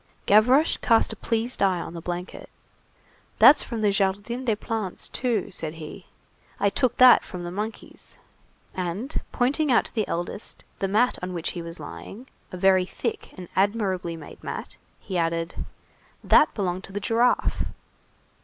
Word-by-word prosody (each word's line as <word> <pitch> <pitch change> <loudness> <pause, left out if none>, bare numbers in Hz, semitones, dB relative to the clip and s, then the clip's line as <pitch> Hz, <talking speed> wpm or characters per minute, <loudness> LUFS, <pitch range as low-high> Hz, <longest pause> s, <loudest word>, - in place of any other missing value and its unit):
Gavroche 250 +9 +5
cast 230 -2 +3
a - - -7
pleased 230 +2 -2
eye 190 -3 +3
on 170 - -6
the 170 - -7
blanket. 175 +2 -6 0.9
"That's 300 - +8
from 230 -3 -4
the 210 -1 +3
Jardin 205 +6 -1
des 225 -3 +2
Plantes, 215 -3 -3
too," 240 -5 -1
said 160 -3 -4
he. 160 +3 -10 0.5
"I 200 0 +2
took 245 +3 0
that 255 -1 +8
from 180 -1 -7
the 175 - -5
monkeys." 210 +4 -7 0.6
And, 185 - -3
pointing 275 +4 +1
out 240 - +4
to - - -9
the 215 -3 -1
eldest 175 +5 -4 0.2
the 195 - 0
mat 220 +6 +2
on 180 0 -4
which 165 - -3
he 175 - -6
was 165 0 -8
lying, 85 - -9 0.3
a 185 - -6
very 185 0 +4
thick - - -4
and 180 -1 -8
admirably 190 -4 0
made 155 -3 -12
mat, - - -5 0.2
he 185 -3 -3
added:— 165 0 -2 0.6
"That - - +5
belonged 185 -2 -2
to - - -12
the 205 - -3
giraffe." 230 +4 +1
200 Hz, 165 wpm, -25 LUFS, 175-230 Hz, 0.9 s, That's